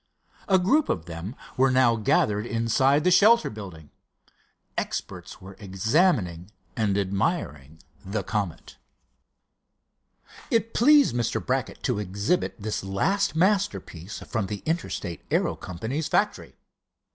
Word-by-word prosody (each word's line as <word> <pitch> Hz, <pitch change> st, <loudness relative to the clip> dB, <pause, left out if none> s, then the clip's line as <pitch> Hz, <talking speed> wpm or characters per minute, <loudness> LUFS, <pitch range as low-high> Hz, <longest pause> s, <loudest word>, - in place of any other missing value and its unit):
A 190 Hz, -, +5 dB
group 270 Hz, +12 st, +2 dB
of 80 Hz, -, -1 dB
them 85 Hz, +7 st, -7 dB, 0.2 s
were 135 Hz, +1 st, +4 dB
now 130 Hz, -2 st, +4 dB
gathered 105 Hz, 0 st, +1 dB
inside 130 Hz, +6 st, +2 dB
the 180 Hz, -, +3 dB
shelter 220 Hz, +6 st, +5 dB
building. 95 Hz, -8 st, -10 dB, 0.8 s
Experts -, -, -5 dB
were 95 Hz, +1 st, -12 dB
examining 100 Hz, -, +1 dB, 0.3 s
and 105 Hz, -3 st, 0 dB
admiring 95 Hz, -, -2 dB, 0.3 s
the 100 Hz, +1 st, -3 dB
Comet. 100 Hz, -4 st, -4 dB, 1.7 s
It 230 Hz, 0 st, 0 dB
pleased 285 Hz, -, +5 dB
Mr. 120 Hz, -2 st, 0 dB
Brackett -, -, -2 dB
to -, -, 0 dB
exhibit 100 Hz, -, -1 dB
this 110 Hz, -1 st, -3 dB
last 195 Hz, -, 0 dB
masterpiece 185 Hz, -, -1 dB
from 110 Hz, -5 st, -2 dB
the 100 Hz, 0 st, -6 dB
Interstate 155 Hz, -, -3 dB
Aero -, -, +1 dB
Company's 115 Hz, -, -4 dB
factory. -, -, -1 dB
110 Hz, 115 wpm, -25 LUFS, -, 1.7 s, A